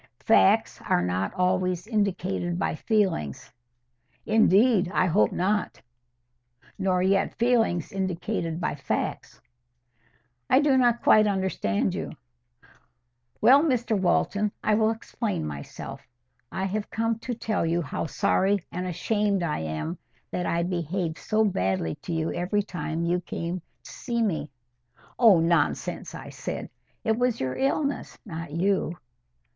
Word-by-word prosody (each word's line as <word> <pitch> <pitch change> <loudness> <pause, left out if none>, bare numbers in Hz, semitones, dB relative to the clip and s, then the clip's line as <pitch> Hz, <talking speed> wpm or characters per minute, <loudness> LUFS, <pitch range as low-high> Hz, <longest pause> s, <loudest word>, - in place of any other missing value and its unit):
"Facts - - +4
are 90 - +3
not 90 +2 -1
always 180 0 +1
indicated 195 -5 -1
by - - 0
feelings." 180 - -1 0.7
"Indeed, 215 -2 +4
I 185 - +2
hope 185 +4 +3
not; 205 +4 -1 1.0
nor 185 -2 +1
yet 195 +1 +1
feelings 230 -8 +2
indicated 185 -3 -2
by 180 - -1
facts." 140 -2 -3 1.1
"I 260 - +6
do 290 -2 +3
not 240 -2 +3
quite 215 0 +6
understand 190 - 0
you." - - -4 1.3
"Well, 260 +6 +7
Mr 245 -7 +1
Walton, 205 +2 +1
I 215 - +2
will 220 +1 +3
explain 225 - -3
myself. 70 -2 -7 0.5
I 190 - -3
have 205 +2 -2
come 225 0 -1
to 245 +1 -4
tell 220 -4 -1
you 170 +1 0
how 145 +3 -3
sorry 195 +5 +2
and 180 +1 -3
ashamed 200 +1 0
I 155 -3 -1
am 80 - -4 0.3
that 180 -1 -2
I 170 0 +1
behaved 170 -1 -2
so 220 0 +1
badly 95 - 0
to - - -6
you 160 -1 -1
every 195 +4 0
time 165 -3 -3
you 175 +1 +1
came 175 0 -4 0.2
to - - -11
see 235 -2 -2
me." 160 -8 -1 0.7
"Oh, 220 -8 +7
nonsense!" 170 +1 0
I - - -8
said. - - -6 0.3
"It 220 +1 +1
was 245 -2 +1
your 130 -1 -2
illness, 280 +1 -1
not 165 -4 -6
you." 175 0 0
190 Hz, 135 wpm, -26 LUFS, 170-215 Hz, 1.3 s, Well